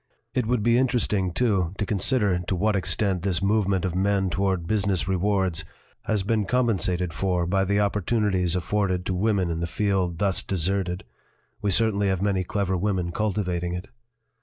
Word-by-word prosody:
It 125 Hz, -4 st, 0 dB
would 120 Hz, -3 st, +1 dB
be 120 Hz, +2 st, +4 dB
interesting, 105 Hz, -7 st, +1 dB
too, 95 Hz, -5 st, 0 dB
to 105 Hz, -, -1 dB
consider 100 Hz, -1 st, +1 dB
to 90 Hz, +2 st, -2 dB
what 105 Hz, +4 st, +1 dB
extent 95 Hz, 0 st, 0 dB
this 90 Hz, -2 st, 0 dB
movement 100 Hz, -2 st, +1 dB
of 90 Hz, -, -1 dB
men 95 Hz, 0 st, +1 dB
toward 95 Hz, -3 st, 0 dB
business 95 Hz, -4 st, 0 dB
rewards 95 Hz, -3 st, 0 dB, 0.4 s
has 105 Hz, -3 st, 0 dB
been 105 Hz, +1 st, 0 dB
compensated 95 Hz, -7 st, 0 dB
for 90 Hz, -1 st, 0 dB
by 95 Hz, +2 st, +1 dB
the 100 Hz, +2 st, +1 dB
opportunities 100 Hz, -3 st, +1 dB
afforded 95 Hz, -1 st, 0 dB
to 95 Hz, -, -1 dB
women 95 Hz, -2 st, +1 dB
in 80 Hz, -, -2 dB
the 85 Hz, -, -2 dB
field 95 Hz, -1 st, 0 dB
thus 100 Hz, 0 st, +1 dB
deserted; 95 Hz, 0 st, -1 dB, 0.6 s
we 105 Hz, -, 0 dB
certainly 105 Hz, 0 st, +2 dB
have 95 Hz, -2 st, +1 dB
many 95 Hz, -1 st, +1 dB
clever 95 Hz, 0 st, -1 dB
women 90 Hz, -2 st, -1 dB
cultivating 90 Hz, -4 st, -1 dB
it." 90 Hz, +3 st, -7 dB
95 Hz, 165 wpm, -25 LUFS, 90-105 Hz, 0.6 s, be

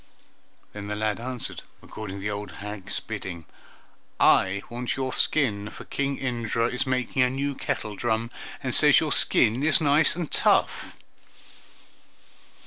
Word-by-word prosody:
Then 100 Hz, -1 st, -7 dB
the 105 Hz, -, -3 dB
lad 105 Hz, 0 st, -1 dB
answered, 125 Hz, 0 st, -1 dB, 0.2 s
according 105 Hz, -3 st, -7 dB
to 100 Hz, -, -7 dB
the 105 Hz, +1 st, -2 dB
old 105 Hz, 0 st, -5 dB
hag's 105 Hz, -1 st, -6 dB
bidding, 85 Hz, -3 st, -6 dB, 0.7 s
"I 95 Hz, +1 st, +4 dB
want 120 Hz, +1 st, -3 dB
your 130 Hz, -1 st, -2 dB
skin, 105 Hz, -9 st, +1 dB
for -, -, -11 dB
King 140 Hz, 0 st, -2 dB
Indra 115 Hz, -3 st, -1 dB
is 125 Hz, +2 st, -2 dB
making 130 Hz, 0 st, 0 dB
a 125 Hz, -, +4 dB
new 140 Hz, +2 st, -2 dB
kettledrum, 110 Hz, -1 st, -2 dB, 0.3 s
and -, -, -2 dB
says -, -, +6 dB
your -, -, -2 dB
skin 115 Hz, +4 st, +3 dB
is 155 Hz, 0 st, +4 dB
nice 150 Hz, +1 st, +3 dB
and 170 Hz, -3 st, -4 dB
tough." -, -, +2 dB
115 Hz, 140 wpm, -26 LUFS, 105-130 Hz, 0.7 s, says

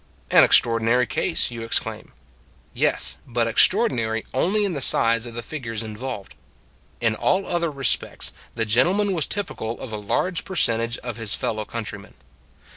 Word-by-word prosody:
An -, -, +7 dB
extraordinary 115 Hz, +2 st, +4 dB
case, 165 Hz, +1 st, -1 dB
you 115 Hz, -1 st, -7 dB
exclaim. 115 Hz, -, -3 dB, 0.6 s
Yes -, -, +2 dB
but 120 Hz, -2 st, 0 dB
extraordinary 115 Hz, -, +3 dB
only 200 Hz, +10 st, +1 dB
in 195 Hz, -, -2 dB
the 140 Hz, -, -4 dB
size 115 Hz, -1 st, +3 dB
of 115 Hz, -, -10 dB
the 120 Hz, -, -5 dB
figures 115 Hz, -7 st, -5 dB
involved. 110 Hz, -1 st, -7 dB, 0.7 s
In 115 Hz, -2 st, +1 dB
all 190 Hz, -, 0 dB
other 170 Hz, -1 st, -1 dB
re 140 Hz, -2 st, -6 dB
spects -, -, +1 dB, 0.2 s
the 115 Hz, -1 st, -1 dB
gentleman 180 Hz, -, +2 dB
was 165 Hz, -5 st, +1 dB
typical 120 Hz, -, -4 dB
of 130 Hz, -, -8 dB
a 110 Hz, -, -4 dB
large 165 Hz, -, -1 dB
percentage 115 Hz, -10 st, +1 dB
of 120 Hz, -3 st, -6 dB
his 115 Hz, -3 st, 0 dB
fellow 110 Hz, -1 st, -2 dB
countrymen. 105 Hz, -3 st, -7 dB
120 Hz, 155 wpm, -23 LUFS, 115-165 Hz, 0.7 s, An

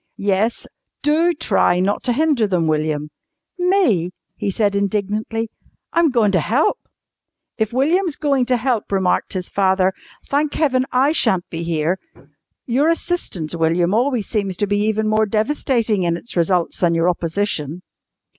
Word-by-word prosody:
"Yes, 205 Hz, +3 st, 0 dB, 0.4 s
DO 325 Hz, +4 st, +2 dB
try 175 Hz, -9 st, +2 dB
not 195 Hz, +3 st, 0 dB
to 245 Hz, -, +2 dB
hinder 285 Hz, -5 st, +2 dB
them, 180 Hz, -4 st, 0 dB
William." 155 Hz, -1 st, -1 dB, 0.5 s
"Me?" 355 Hz, -, +2 dB, 0.3 s
he -, -, -3 dB
said 200 Hz, +1 st, +1 dB
indignantly. 210 Hz, +3 st, -2 dB, 0.4 s
"I'm 335 Hz, -1 st, +4 dB
goin' 230 Hz, -6 st, +2 dB
to 185 Hz, -, +2 dB
help!" 270 Hz, -, +1 dB, 0.8 s
"If 220 Hz, -1 st, 0 dB
William's 315 Hz, +6 st, +1 dB
going 275 Hz, -5 st, +1 dB
to 250 Hz, -1 st, +2 dB
help," 245 Hz, -3 st, -1 dB
remarked 190 Hz, -2 st, +1 dB
his 185 Hz, -2 st, -3 dB
father, 190 Hz, -1 st, +2 dB, 0.3 s
"thank 290 Hz, +1 st, 0 dB
Heaven 260 Hz, -4 st, +1 dB
I 265 Hz, +4 st, +3 dB
shan't 220 Hz, -, +2 dB
be 165 Hz, -, -4 dB
here. 170 Hz, +2 st, -1 dB, 0.7 s
Your 270 Hz, +6 st, +2 dB
assistance, 330 Hz, -, -2 dB
William, 170 Hz, +2 st, +1 dB
always 245 Hz, -1 st, +1 dB
seems 195 Hz, -5 st, -2 dB
to 205 Hz, -, +1 dB
be 205 Hz, 0 st, 0 dB
even 220 Hz, 0 st, 0 dB
more 215 Hz, 0 st, +2 dB
devastating 225 Hz, -1 st, 0 dB
in 170 Hz, -1 st, 0 dB
its 235 Hz, -, -10 dB
results 175 Hz, 0 st, +1 dB
than 170 Hz, -2 st, +2 dB
your 165 Hz, +1 st, +2 dB
opposition!" 170 Hz, -2 st, -2 dB
210 Hz, 150 wpm, -20 LUFS, 180-260 Hz, 0.8 s, I'm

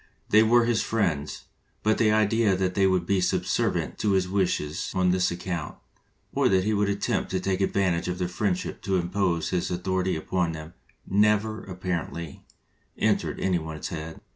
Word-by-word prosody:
They 105 Hz, -, +6 dB
were 115 Hz, +2 st, +4 dB
his 115 Hz, -2 st, +2 dB
friends, 80 Hz, -10 st, -1 dB, 0.4 s
but 110 Hz, 0 st, +2 dB
the 110 Hz, -2 st, +4 dB
idea 110 Hz, -1 st, +3 dB
that 95 Hz, -1 st, 0 dB
they 95 Hz, 0 st, +3 dB
would 95 Hz, -2 st, +1 dB
be 95 Hz, +1 st, +1 dB
subservient 90 Hz, -, 0 dB
to 105 Hz, -2 st, +1 dB
his 95 Hz, -1 st, +2 dB
wishes 90 Hz, -5 st, -1 dB
on 90 Hz, -1 st, +3 dB
this 90 Hz, 0 st, +2 dB
account, 85 Hz, -3 st, -4 dB, 0.6 s
or -, -, +3 dB
that 95 Hz, -1 st, +3 dB
he 110 Hz, +2 st, +1 dB
would 105 Hz, -1 st, +1 dB
attempt 100 Hz, 0 st, -1 dB
to 95 Hz, -, -1 dB
take 95 Hz, 0 st, -1 dB
advan 95 Hz, -1 st, +1 dB
tage 85 Hz, +1 st, -2 dB
of 90 Hz, 0 st, -2 dB
their 90 Hz, -1 st, -1 dB
friendship 90 Hz, 0 st, -2 dB
to 95 Hz, -, -1 dB
impose 90 Hz, -1 st, 0 dB
his 90 Hz, -2 st, -1 dB
author 95 Hz, +1 st, -1 dB
ity 95 Hz, 0 st, 0 dB
upon 85 Hz, +1 st, -1 dB
them, 80 Hz, +1 st, -8 dB, 0.3 s
never, 105 Hz, +2 st, +2 dB
apparently, 90 Hz, -4 st, -5 dB, 0.5 s
entered -, -, 0 dB
any 90 Hz, -2 st, +1 dB
one's 80 Hz, -1 st, -6 dB
head. 80 Hz, -1 st, -6 dB
95 Hz, 180 wpm, -26 LUFS, 85-100 Hz, 0.6 s, They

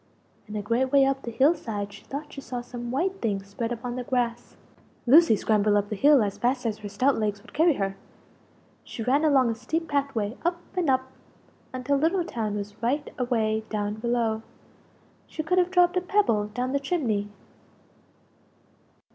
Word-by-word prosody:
And 210 Hz, 0 st, -5 dB
a 205 Hz, -, -3 dB
great 245 Hz, +5 st, 0 dB
way 280 Hz, -1 st, +6 dB
up 270 Hz, 0 st, 0 dB
the 235 Hz, -, -6 dB
hill 270 Hz, +7 st, +4 dB
side 205 Hz, -10 st, -5 dB
she 200 Hz, -, -13 dB
thought 290 Hz, +2 st, -6 dB
she 275 Hz, -, -7 dB
saw 250 Hz, -2 st, -5 dB
some 240 Hz, 0 st, -7 dB
white 365 Hz, +10 st, -1 dB
things 200 Hz, -4 st, -1 dB
spread 225 Hz, +4 st, -4 dB
upon 240 Hz, +1 st, -4 dB
the 250 Hz, -, -3 dB
grass. 240 Hz, -1 st, -2 dB, 0.5 s
Lucie 295 Hz, 0 st, +7 dB
scrambled 210 Hz, 0 st, +2 dB
up 205 Hz, 0 st, +1 dB
the 215 Hz, -, -2 dB
hill 280 Hz, +2 st, +5 dB
as 200 Hz, -1 st, -3 dB
fast 250 Hz, +1 st, 0 dB
as 215 Hz, -2 st, -1 dB
her 210 Hz, -1 st, -7 dB
stout 255 Hz, +7 st, +1 dB
legs 210 Hz, -2 st, -1 dB
would -, -, -17 dB
carry 325 Hz, +2 st, +4 dB
her; 195 Hz, -3 st, -2 dB, 0.9 s
she 225 Hz, -, -6 dB
ran 275 Hz, +6 st, +2 dB
along 270 Hz, -6 st, +4 dB
a -, -, -1 dB
steep 315 Hz, +9 st, -3 dB
path 280 Hz, -2 st, -1 dB
way 215 Hz, +1 st, -1 dB
up 345 Hz, +1 st, 0 dB, 0.2 s
and 355 Hz, -5 st, +1 dB
up 260 Hz, 0 st, +1 dB, 0.6 s
until 260 Hz, +2 st, 0 dB
Little 335 Hz, +5 st, +1 dB
town 220 Hz, -9 st, -3 dB
was 205 Hz, +1 st, -6 dB
right 280 Hz, +6 st, -1 dB
away 220 Hz, -3 st, 0 dB
down 205 Hz, -1 st, -2 dB
below 225 Hz, 0 st, -1 dB, 0.9 s
she 315 Hz, -, -5 dB
could 360 Hz, +4 st, +2 dB
have 360 Hz, 0 st, +2 dB
dropped 360 Hz, -1 st, +4 dB
a 365 Hz, -, +2 dB
pebble 355 Hz, -, +1 dB
down 250 Hz, +4 st, -3 dB
the 280 Hz, -, +1 dB
chimney! 245 Hz, -, -1 dB
245 Hz, 190 wpm, -26 LUFS, 215-285 Hz, 0.9 s, Lucie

